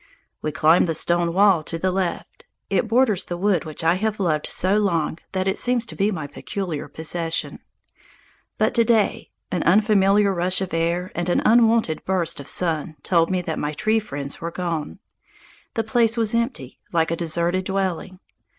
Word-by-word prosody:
We 155 - -2
climbed 155 +4 +4
the 165 - -1
stone 170 +1 +1
wall 190 -2 +4
to 165 +2 -4
the 185 +3 0
left. 180 -2 -4 0.3
It 195 +3 +1
borders 225 -5 +2
the 175 - -5
wood 190 -3 +1
which 155 +1 -6
I 165 +1 +4
have 215 -1 -1
loved 155 -6 0
so 190 +3 +1
long 170 -5 0
that 190 0 -1
it 190 - 0
seems 245 -1 +1
to - - -9
be 200 +1 +1
my 165 -8 -4
peculiar 160 +2 -5
possession. 165 +2 -2 1.0
But - - +1
to 235 - +4
day 225 -3 +1 0.2
an 180 - -1
unfamiliar 200 +1 +3
rush 180 +1 +1
of 190 -4 -4
air 170 +2 -1
and 175 0 -2
an - - +1
unwonted 225 -7 +4
outburst 170 -4 -1
of 140 - -9
sun 160 -3 -1
told 165 -2 +2
me 185 -1 -1
that 160 -2 -3
my 150 +1 -2
tree 220 +8 +1
friends 140 -9 -6
were 170 - -3
gone. 170 -3 -4 0.8
The 225 - 0
place 225 +1 +2
was 225 -1 +1
empty, 230 - -2
like 165 -1 +1
a - - +1
deserted 170 +2 -1
dwelling. 190 -1 -2
180 Hz, 180 wpm, -22 LUFS, 165-205 Hz, 1.0 s, climbed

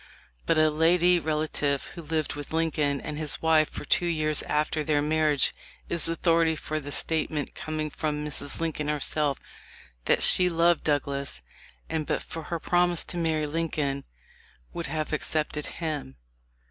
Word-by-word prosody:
But - - +3
a 155 0 +4
lady 175 +3 +4
relative 150 -3 0
who 170 - -8
lived 155 -1 -2
with 145 -1 -7
Lincoln 150 -3 +1
and 150 +2 -5
his 155 -2 -1
wife 160 -1 +3
for - - -7
two 175 - +2
years 155 -2 +1
after 150 +1 0
their 150 0 +2
marriage 150 -1 +2 0.4
is 170 -1 +4
authority 165 -1 +2
for 155 0 -3
the 145 -1 -8
statement 155 -2 -1
coming 155 -1 -4
from 150 0 -2
Mrs. 145 -1 -4
Lincoln 160 -2 -2
herself 150 -1 0 0.7
that - - +3
"she 180 -1 +6
loved 170 0 +3
Douglas, 140 - -1 0.4
and 155 -2 -2
but - - -1
for 165 - -6
her 170 +1 -3
promise 175 0 +2
to 175 - -5
marry 160 -2 0
Lincoln 150 -3 -2 0.7
would 170 -3 -4
have 155 +1 -3
accepted 150 0 -1
him." 150 - -4
155 Hz, 155 wpm, -27 LUFS, 150-165 Hz, 0.7 s, she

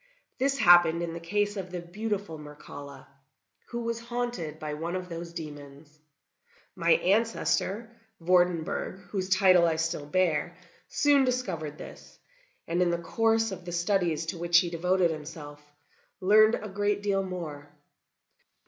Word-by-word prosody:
This 275 +1 +1
happened 175 -4 +6
in 165 -1 -4
the 170 - -5
case 205 +4 -1
of 185 -2 -5
the 180 0 -5
beautiful 195 -1 -4
Mircalla, 145 -2 -11 0.6
who 235 0 -4
was 230 0 -2
haunted 235 -10 -4
by 155 -1 -5
one 165 +4 -4
of 185 0 -5
those 170 0 -6
demons. 145 -2 -10 0.8
My 170 -2 +3
ancestor, 225 +2 0 0.2
Vordenburg, 175 +1 +1
whose 190 -2 -2
title 185 -2 +5
I 165 - +1
still 160 -2 -2
bear, 175 +1 0 0.3
soon 285 -1 +3
discovered 185 - -2
this, - - -12 0.5
and 170 +2 0
in 180 - +3
the 170 - 0
course 225 +6 +1
of 190 -1 -7
the 175 - -7
studies 170 -2 0
to 165 +1 -5
which 170 0 +4
he 170 0 +2
devoted 180 +1 +2
himself, 150 -1 -8 0.6
learned 215 +4 +5
a 215 - -6
great 205 +1 -1
deal 200 -1 +1
more. 165 -6 -6
175 Hz, 145 wpm, -28 LUFS, 160-205 Hz, 0.8 s, happened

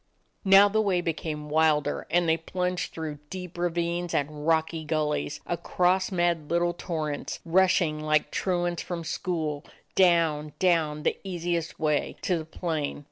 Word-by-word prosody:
Now 195 0 +8
the 220 +2 +1
way 195 -4 +1
became 155 -3 -3
wilder 155 -1 +2
and 175 0 +2
they 160 - +4
plunged 180 +2 -2
through 155 -3 -5
deep 180 -2 -7
ravines 175 0 -1
and 150 +1 -2
rocky 160 0 +1
gul 155 -1 0
lies; 150 0 -2
across 180 +2 +1
imad 175 -4 0
little 175 0 +1
torrents, 155 -4 -4
rushing 175 -3 +3
like 155 0 +1
truants 175 -2 -1
from 175 -2 -5
school, 160 -3 -2 0.3
down, 165 -5 +3
down, 160 -5 +1
the - - 0
easiest 175 -3 -3
way, 150 -2 0
to 180 - +1
the 160 -2 -4
plain. 160 -3 -3
165 Hz, 145 wpm, -27 LUFS, 155-175 Hz, 0.3 s, Now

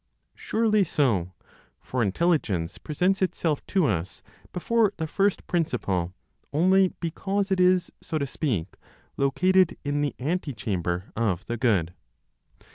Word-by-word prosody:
Surely 215 -2 +1
so, 105 - 0 0.4
for 125 - -3
Intelligence 100 - 0
presents 180 +6 0
itself 165 -5 0
to 190 -4 +2
us 95 - -2 0.3
before 210 +4 +1
the 160 - -2
first 195 +5 0
Principle 100 - -1 0.4
only 185 +5 +4
because 195 +4 -2
it 190 - +2
is, 180 -1 +3
so 160 - -3
to 140 - -1
speak, 130 - -3 0.4
located 185 +7 +3
in 145 0 0
the 145 -1 -1
antechamber 105 - -2
of 105 -4 -1
the 120 - -3
Good. 100 -9 +1
150 Hz, 120 wpm, -26 LUFS, -, 0.4 s, only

